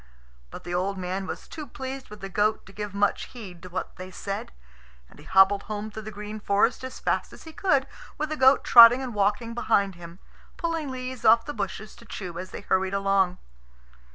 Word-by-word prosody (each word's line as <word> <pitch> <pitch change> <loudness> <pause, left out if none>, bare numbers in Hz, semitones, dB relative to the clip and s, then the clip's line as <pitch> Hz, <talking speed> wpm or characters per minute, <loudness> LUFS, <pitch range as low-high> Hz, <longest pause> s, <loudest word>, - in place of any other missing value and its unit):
But - - -10
the 175 - -5
old 190 +2 -1
man 185 +1 -3
was - - -6
too 305 -3 -8
pleased 265 +1 -7
with 210 0 -11
the 195 - -5
goat 210 +3 0
to 195 - -15
give 210 -1 -6
much 205 0 +1
heed 190 -8 -11
to 185 - -10
what 185 +1 -5
they 185 0 -8
said; 195 +1 -5 0.6
and - - -19
he 150 - -14
hobbled 190 +2 +5
home 215 0 -4
through 220 - -7
the 215 - -7
green 210 +1 -7
forest 210 +5 +1
as 260 0 -7
fast - - -1
as - - -13
he 320 - -11
could, 290 -7 +2 0.3
with 305 +1 -2
the 310 - -2
goat 265 -1 +5
trotting 240 +2 +9
and 250 -3 -5
walking 210 +3 0
behind 200 -4 +1
him, 170 0 -11 0.4
pulling 330 -4 -2
leaves 255 -1 -6
off 230 +1 +6
the 295 - -5
bushes 200 -1 -5
to 235 - -15
chew 180 -6 -7
as 185 0 -6
they - - -8
hurried 190 -1 0
along. 195 -2 +2
210 Hz, 210 wpm, -26 LUFS, 190-250 Hz, 0.6 s, trotting